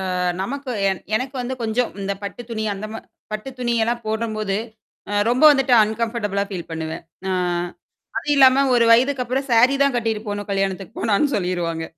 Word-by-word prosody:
அ - - -1 0.2
நமக்கு 275 +6 -4 0.2
என் 190 - -3
எனக்கு 260 +4 -2
வந்து 245 +1 -3
கொஞ்சம் 230 +2 0
இந்த 200 0 -1
பட்டு 200 +4 -6
துணி 220 -2 -3
அந்த 200 +2 -6
ம - - -5 0.4
பட்டு 215 +5 -4
துணியெல்லாம் 235 -1 0
போடும்போது 215 -2 -1 0.5
அ - - -2 0.2
ரொம்ப 245 +4 +2
வந்துட்டு 270 -3 +2
அன்கம்ஃபர்டபிளா 215 -2 -1
ஃபீல் 180 -4 -6
பண்ணுவேன். 160 0 -5 0.3
ஆ. - - 0 0.9
அது - - -7
இல்லாம 265 0 +6
ஒரு 235 -1 +4
வயதுக்குப்புறம் 255 +2 +2
சாரி 245 +4 +5
தான் 280 -2 +2
கட்டிட்டு 225 -3 -1
போணும் 205 0 -4
கல்யாணத்துக்கு 195 +1 -2
போனான்னு 225 +6 +2
சொல்லிருவாங்க. 175 -4 -2
225 Hz, 160 wpm, -21 LUFS, 200-250 Hz, 0.9 s, இல்லாம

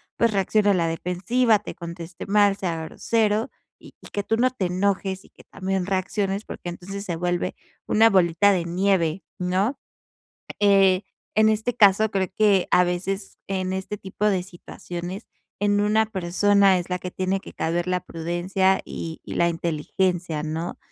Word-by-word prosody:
pues 230 -1 +2
reaccione 205 +1 +2
a - - +4
la 170 -3 +1
defensiva, 190 +8 +1
te 210 - -8
conteste 170 0 -8
mal, 205 -1 +4
sea 165 -4 -3
grosero, 220 - 0 0.3
y - - -15 0.2
que 205 - -2
tú 225 +2 0
no 255 +2 +3
te 250 -7 -3
enojes 190 +1 -1
y - - -19
que - - -19
también 190 -1 -3
reacciones, 195 +1 -1
porque 175 - -7
entonces 195 +3 -7
se 175 - -3
vuelve 175 +1 -1 0.3
una 225 +1 +5
bolita 185 0 +4
de 180 -4 0
nieve, 175 -1 +1
¿no? 190 +8 0 0.8
Eh, 195 -2 +4 0.3
en 215 +1 +5
este 220 +3 0
caso, 205 +1 +5
creo 190 -3 0
que 205 -4 +3
a 180 - +5
veces 190 +3 -3
en 185 -1 -2
este 190 +2 -4
tipo 195 +1 -3
de 195 -3 +2
situaciones 175 +1 -8 0.3
en 205 0 +2
una 215 +1 +3
persona 195 0 +3
es 175 +1 -6
la 180 - -1
que 180 - -6
tiene 185 +1 -1
que - - -12
caber 170 +2 -1
la 180 0 +1
prudencia 180 +3 0
y 165 -1 -6
y - - -7
la 170 - +3
inteligencia, 170 0 -1
¿no? 160 +3 -4
190 Hz, 165 wpm, -24 LUFS, 175-205 Hz, 0.8 s, una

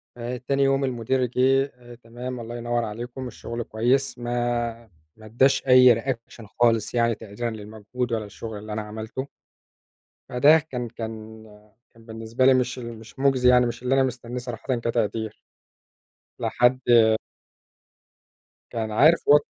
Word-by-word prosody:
تاني 125 +3 -2
يوم 135 0 +2
المدير 130 0 0
جِه: 130 +2 +2 0.4
"تمام 125 +2 -7
الله 120 +1 -7
ينور 120 0 -1
عليكم، 120 +4 -6
الشغل 120 0 -6
كويس." 125 +6 0
ما 120 -1 -2 0.3
ما 110 - -15
ادّاش 135 +5 +2
أي 125 -1 +8
reaction 115 -3 -5
خالص 115 -3 +2
يعني 115 -1 +2
تقديرًا 110 +2 -5
للمجهود 110 +3 -6
ولا 110 -2 -2
الشغل 110 +1 -8
اللي 105 +1 -7
أنا 110 - -2
عملته. 110 +5 -6 1.0
فده 145 +6 +5
كان 130 -6 -5
كان 110 -1 -8 0.5
كان 115 -1 -19
بالنسبة 115 +2 -2
لي 135 - +7
مش 125 0 0
ال 115 -2 -8
مش 115 +4 -15
مُجزي 130 -2 +3
يعني، 125 0 +5
مش 120 0 -5
اللي 130 +1 +2
أنا 135 - +4
مستنيه 125 -1 -4
صراحةً 125 +1 -3
كتقدير. 115 -2 -2 1.0
لحد 120 +1 +2 1.9
كان 110 -2 -3
عارف 155 +9 +4
و 145 - +9
120 Hz, 140 wpm, -24 LUFS, 115-130 Hz, 1.9 s, و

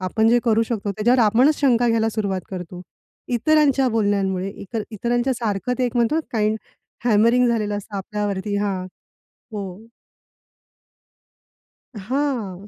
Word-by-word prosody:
आपण 220 +4 +1
जे 240 - +5
करू 225 -1 +3
शकतो 210 -3 -3
त्याच्यावर 235 +5 +2
आपणच 245 +8 +4
शंका 245 -3 +3
घ्यायला 225 -1 +2
सुरुवात 200 -4 -2
करतो. 180 -1 -7 0.5
इतरांच्या 275 +2 +3
बोलण्यांमुळे 200 -4 0
इतर 210 +3 -6
इतरांच्या 240 +4 0
सारखं 215 -1 -2
ते 255 - +1
एक 245 0 -4
म्हणतो, 240 +7 +2
काइंड 215 -1 +1 0.5
हॅमरिंग 235 +2 +4
झालेलं 210 -3 0
असतं 205 0 -8
आपल्यावरती 205 0 -3
हां. 195 -3 -2 0.7
हो. 200 0 -7 2.1
हां. 215 -4 -3
220 Hz, 125 wpm, -22 LUFS, 200-240 Hz, 2.1 s, जे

